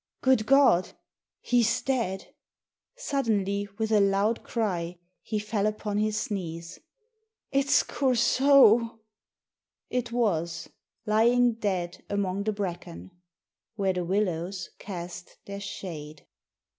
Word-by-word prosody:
"Good 260 -5 +3
God! 270 -10 +4 0.5
He's 235 -2 +2
dead!" 230 -8 -2 0.6
Suddenly, 210 - -1
with 220 0 -1
a 215 - +5
loud 200 +3 +2
cry, 180 -7 -2 0.2
he 215 - -3
fell 210 0 -1
upon 210 -1 -2
his 215 +3 -1
knees. 170 -3 -5 0.7
"It'sCoursault!"... 260 -3 +4 0.9
It 245 -1 -2
was. 170 -8 -1 0.4
Lying 235 +3 +4
dead 185 -5 -3
among 200 -1 -1
the 215 - +1
bracken 175 - -6 0.2
— 165 - -66
" - - -64
Where 195 -3 0
the 180 -1 -2
Willows 185 -1 -2
cast 175 -2 -8
their 200 0 -6
Shade." 155 -7 -8
205 Hz, 105 wpm, -27 LUFS, 180-230 Hz, 0.9 s, a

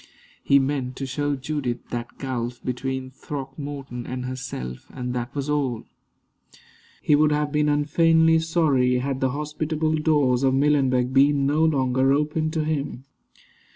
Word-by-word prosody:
He 140 - +5
meant 135 -2 -1
to 135 - -4
show 145 +2 -1
Judith 130 -3 -4
that 120 0 -5
gulf 125 -2 -4
between 130 +1 -3
Throckmorton 135 -2 -7
and 125 0 -4
herself, 125 - -6
and 125 0 -5
that 120 +2 -4
was 140 0 -2
all. 140 -6 -1 1.2
He - - +3
would 150 +1 +4
have 150 0 0
been 150 0 +2
unfeignedly 160 +2 +4
sorry 155 -6 +2
had 130 +1 -2
the 130 - +2
hospitable 150 +2 -2
doors 145 -5 +2
of 135 -1 +3
Millenbeck 135 -3 +2
been 140 +1 +4
no 150 +3 +2
longer 135 -3 +2
open 150 +2 0
to 160 -1 -1
him. 145 -4 -3
140 Hz, 145 wpm, -24 LUFS, 130-150 Hz, 1.2 s, He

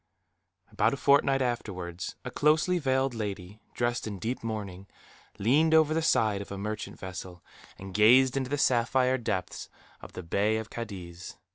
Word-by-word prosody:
About - - +1
a - - -11
fortnight 140 0 +3
afterwards, 90 -8 -4
a - - -5
closely 155 +4 +2
veiled 130 -2 0
lady, 105 -2 -6
dressed 120 -1 -1
in 105 -2 -5
deep 115 +7 -4
mourning, 100 -4 -5 0.5
leaned 150 +10 +3
over 155 -1 +4
the 165 - +1
side 110 -10 +2
of 100 - -9
a 100 - -5
merchant 105 +2 -5
vessel, 90 -1 -8 0.3
and 95 0 -9
gazed 125 +5 +5
into 130 -2 -2
the 145 - -1
sapphire 130 0 +2
depths 95 -6 -4 0.3
of - - -12
the 90 - -7
Bay 105 +6 +1
of 110 0 -6
Cadiz. 90 -6 -8
110 Hz, 160 wpm, -28 LUFS, 100-130 Hz, 0.5 s, gazed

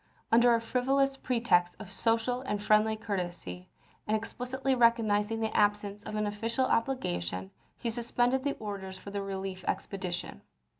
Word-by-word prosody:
Under 235 +1 +6
a - - +2
frivolous 270 +4 +1
pretext 230 -10 +2
of 205 -3 -10
social 230 +4 +1
and 210 -6 -2
friendly 215 +1 +3
courtesy, 175 - -4 0.4
and 215 +1 +3
explicitly 250 +4 -2
recognizing 225 -3 +3
the 220 0 -1
absence 205 -1 +2
of - - -5
any 210 0 0
official 230 +5 0
obligation, 95 - -1 0.3
he 235 - -2
suspended 245 +2 +1
the 285 0 0
orders 195 -3 -6
for 200 - -9
the 200 0 -2
relief 190 -1 -4
expedition. 185 -2 -3
215 Hz, 145 wpm, -30 LUFS, 195-240 Hz, 0.4 s, Under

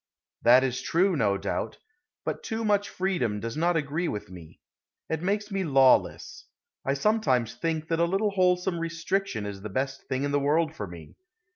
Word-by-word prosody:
That 125 +2 +6
is 130 -1 -1
true, 185 +2 +2
no 100 -8 +2
doubt; - - -3 0.5
but - - -3
too 225 0 -3
much 205 -1 +2
freedom 175 - -1
does 115 +2 -5
not 170 +2 +2
agree 155 +3 -1
with 105 - -5
me. 85 -3 -12 0.5
It 160 -1 -1
makes 205 +3 -1
me 195 -1 -1
lawless. 135 -5 +3 0.4
I 135 - 0
sometimes 135 - +1
think 160 -2 -2
that 165 0 0
a 170 - +4
little 195 +4 +1
wholesome 180 -2 +2
restriction 165 - -2
is 100 -1 -6
the 110 - -6
best 135 +6 -3
thing 130 +1 -1
in 145 - -1
the 145 - +2
world 155 +3 +1
for 105 - -5
me. 85 -2 -12
160 Hz, 180 wpm, -27 LUFS, 125-185 Hz, 0.5 s, That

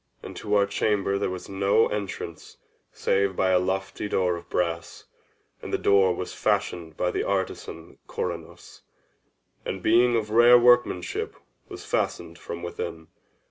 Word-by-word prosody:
And - - -8
to 105 -1 -1
our 100 -1 +4
chamber 100 -1 0
there 100 - -1
was 90 -1 -6
no 100 +3 +2
entrance 100 -5 -6 0.3
save 100 -1 0
by 95 +1 +2
a 90 - +4
lofty 95 +2 -3
door 90 -3 +1
of 85 0 -10
brass: 85 -1 -2 0.6
and - - -7
the - - +1
door 95 -2 +3
was 90 - -5
fashioned 80 -3 -1
by 90 - 0
the - - -1
artisan 95 -1 -4
Corinnos, - - -6 0.8
and, 95 -1 -5
being 120 +2 +4
of 110 -2 -1
rare 120 +2 +7
workmanship, 120 -7 +2 0.3
was - - -9
fastened 85 +1 -2
from 85 - -7
within. 80 -2 -6
95 Hz, 145 wpm, -25 LUFS, 90-105 Hz, 0.8 s, rare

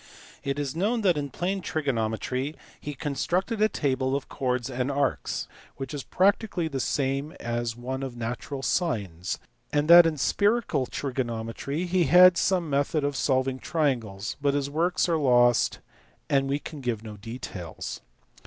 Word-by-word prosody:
It 140 0 -2
is 145 -1 -3
known 215 +7 +1
that 185 -5 +3
in 145 -1 -3
plane 190 +7 -2
trigonometry 130 -1 -2 0.2
he 145 -1 -6
constructed 180 - -1
a 215 - +5
table 130 -4 0
of 140 - -4
chords 125 -2 -1
of 130 0 -2
arcs, 135 - -1 0.3
which 135 0 -5
is 145 - -3
practically 190 - +1
the 140 -4 -3
same 140 +3 -1
as 120 -4 -3
one 130 +2 -4
of 130 -3 -5
natural 120 +4 -4
sines; 100 - -1 0.3
and 145 +1 +1
that 170 -1 +10
in 155 -2 -1
spherical 205 - +1
trigonometry 130 +3 -3
he 180 -1 +2
had 180 +5 +8
some 175 +1 +1
method 145 +1 0
of 145 0 -1
solving 130 -1 +1
triangles: 120 - -1
but 140 0 +2
his 140 0 -1
works 170 +5 +1
are 170 -2 +2
lost, 120 -3 +3 0.5
and 135 -1 +2
we 140 - +1
can 150 0 -8
give 120 -4 -2
no 110 -2 -8
details. 105 -5 -7
140 Hz, 155 wpm, -27 LUFS, 125-160 Hz, 0.5 s, that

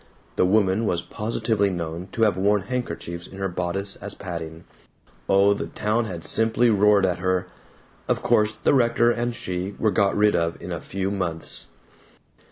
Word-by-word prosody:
The 90 - +3
woman 105 +2 +2
was 85 -1 0
positively 110 -2 -1
known 85 0 -4
to 115 - +1
have 105 -4 +3
worn 100 +1 +2
handkerchiefs 100 -8 -4
in 95 - -12
her 95 0 -1
bodice 95 +2 -2
as 105 0 -7
padding 85 -3 -7 0.7
oh, 100 +1 +5
the 100 - -4
town 110 +2 -1
had 85 -6 -5
simply 115 +1 +3
roared 105 -1 +4
at 90 -2 -1
her. 95 0 0 0.6
Of - - 0
course 105 0 +3
the - - +4
rector 120 -2 +3
and 120 0 -2
she 90 +1 -4
were 110 - +2
got 100 -1 +2
rid 105 0 +4
of 85 0 -1
in - - -7
a - - -4
few 95 0 -3
months. 85 -5 -3
100 Hz, 175 wpm, -24 LUFS, 90-110 Hz, 0.7 s, oh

